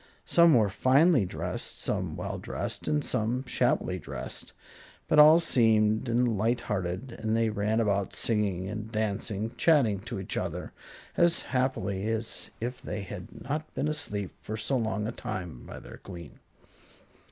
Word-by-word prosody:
Some 170 -2 +6
were 105 -4 +3
finely 135 - +4
dressed, - - -3
some - - -2
well - - -4
dressed - - -4
and 75 -1 +1
some 120 +5 -1
shabbily 90 -6 0
dressed; 70 -5 -7 0.6
but - - +4
all 155 +2 +9
seemed 110 -6 +3
and 115 -3 +2
light 115 +3 +1
hearted, 95 +5 -3
and 110 0 0
they 115 -1 +2
ran 105 +2 0
about 100 -3 0
singing 100 -5 0
and 110 +2 -5
dancing 110 0 -2
chatting 130 - +4
to 100 -1 -6
each 95 - -4
other - - -4 0.4
as 170 0 +4
happily 110 -7 -1
as 110 0 -3
if 125 +2 -4
they 105 - -4
had 95 - -9
not 150 +2 -3
been 150 - 0
asleep 105 - -2
for 110 - -5
so 110 +6 0
long 110 -3 -1
a 110 - -2
time 90 - -6
by - - -8
their - - -11
Queen. 85 -5 -11
110 Hz, 155 wpm, -29 LUFS, 100-125 Hz, 0.6 s, all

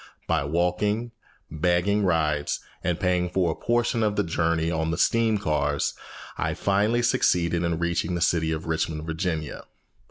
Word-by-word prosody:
By - - +1
walking, 90 +9 0 0.4
begging 90 +6 +1
rides, 75 -5 +1 0.2
and 90 -1 -1
paying 90 -1 +1
for 90 -2 +1
a - - -4
portion 120 -1 0
of 105 -2 +1
the 105 - +1
journey 80 -1 0
on 80 -1 -1
the 85 - -1
steam 115 -2 +2
cars, 75 -6 0 0.5
I - - -1
finally 105 +5 +1
succeeded 85 -7 +2
in 85 -1 0
reaching 85 +1 -1
the 85 - -3
city 80 -1 +2
of 80 0 -3
Richmond; 80 -1 -2
Virginia. 80 -2 -3
85 Hz, 155 wpm, -25 LUFS, 80-100 Hz, 0.5 s, steam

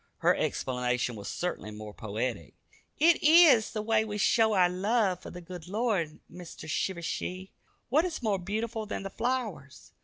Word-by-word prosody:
Her - - +3
explanation 125 -1 -1
was 100 -2 -8
certainly 175 -11 -3
more 105 0 -9
poetic. 110 - -4 0.4
"It 330 +2 +4
eez 310 -8 +6
the 215 -2 -3
way 220 0 +2
we 210 -1 -5
show 220 +2 +3
our 185 -3 +5
love 190 0 0
for - - -9
the 180 - -9
good 175 -1 -9
Lord, 200 -6 -1
Meester 175 -2 -10
Shivershee. 180 +3 -3 0.4
What 295 +7 +4
is 340 -7 -4
more 205 -4 +1
beautiful 220 +4 -3
than 200 - -4
the 195 - -6
flowers? 210 - -4
190 Hz, 160 wpm, -29 LUFS, 155-225 Hz, 0.4 s, eez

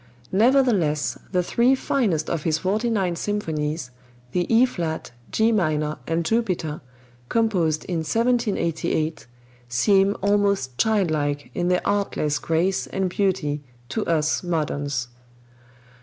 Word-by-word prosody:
Nevertheless, 210 - +3 0.2
the 180 -2 +2
three 240 +8 +3
finest 210 - 0
of 165 - -1
his 155 0 +1
forty 210 +7 0
nine 190 -6 0
symphonies, 155 -8 -2 0.4
the 175 - -1
E 230 +3 +6
flat, 165 - -4 0.2
G 220 +1 +3
minor 155 -7 0
and 165 0 0
Jupiter, 185 -8 -1 0.5
composed 180 -9 +1
in 175 - -2
1788, 170 - 0 0.4
seem 195 - +3
almost 200 -10 +1
childlike 155 -9 +1
in 175 -1 -1
their 180 0 +1
artless 195 -7 0
grace 170 +4 0
and 190 -2 -2
beauty 180 -7 0 0.3
to 220 - -1
us 155 -2 +1
moderns. 145 -7 -2
175 Hz, 115 wpm, -23 LUFS, 155-205 Hz, 0.5 s, E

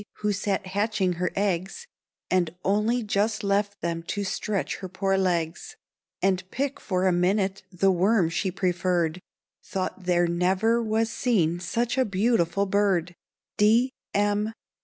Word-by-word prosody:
who 210 0 +1
sat 200 0 -1
hatching 195 -1 0
her 180 0 -1
eggs, 195 - -1 0.5
And 175 -3 +1
only 215 +5 +2
just 215 +1 0
left 200 0 0
them 170 -1 -2
to 205 - -2
stretch 200 +1 -2
her 185 - -7
poor 195 +1 0
legs, 175 -3 -1 0.5
And 190 -1 +2
pick 275 +4 -2
for 185 -2 -1
a 185 - +4
minute 190 +2 +1
the 190 +1 +3
worm 190 0 +3
she 190 +3 -1
preferred, 180 -2 0 0.4
Thought 190 -1 -4
there 175 -1 +3
never 185 +7 +2
was 225 0 0
seen 175 -9 +1
such 235 +8 -1
a 260 - +4
beautiful 200 -2 +1
bird. 190 -3 +1 0.5
_D. 225 +5 +5 0.2
M. 205 +2 +1
195 Hz, 140 wpm, -26 LUFS, 180-210 Hz, 0.5 s, D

